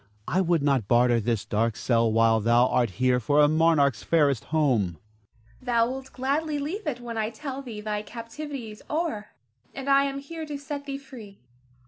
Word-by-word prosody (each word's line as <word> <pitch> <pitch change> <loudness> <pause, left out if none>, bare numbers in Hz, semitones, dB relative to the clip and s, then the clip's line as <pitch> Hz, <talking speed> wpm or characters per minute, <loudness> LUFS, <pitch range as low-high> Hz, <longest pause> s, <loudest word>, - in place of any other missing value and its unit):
I 185 - +1
would 170 -4 +1
not 135 -8 +1
barter 120 +1 +4
this 115 -1 -1
dark 115 +1 0
cell 115 -2 +1
while 115 0 +4
thou 120 +3 +4
art 120 -2 +2
here 125 0 +3
for 145 +6 +2
a 150 - +7
monarch's 155 -2 +3
fairest 145 -7 +2
home. 130 - +1
Zara. - - -16 0.9
Thou 240 - -3
wilt 265 0 -7
gladly 290 +4 -1
leave 320 +7 -4
it 255 -5 -2
when 235 -2 -5
I 215 0 0
tell 275 +2 -6
thee 230 -6 -8
thy 210 -1 -2
captivity 235 +3 -7
is 210 - -13
o'er, 300 -10 -2 0.5
and 270 0 -6
I 275 0 +5
am 275 0 -3
here 315 +3 -7
to 295 -1 -4
set 285 0 -6
thee 275 -1 -3
free. 240 -8 -12
210 Hz, 190 wpm, -26 LUFS, -, 0.9 s, a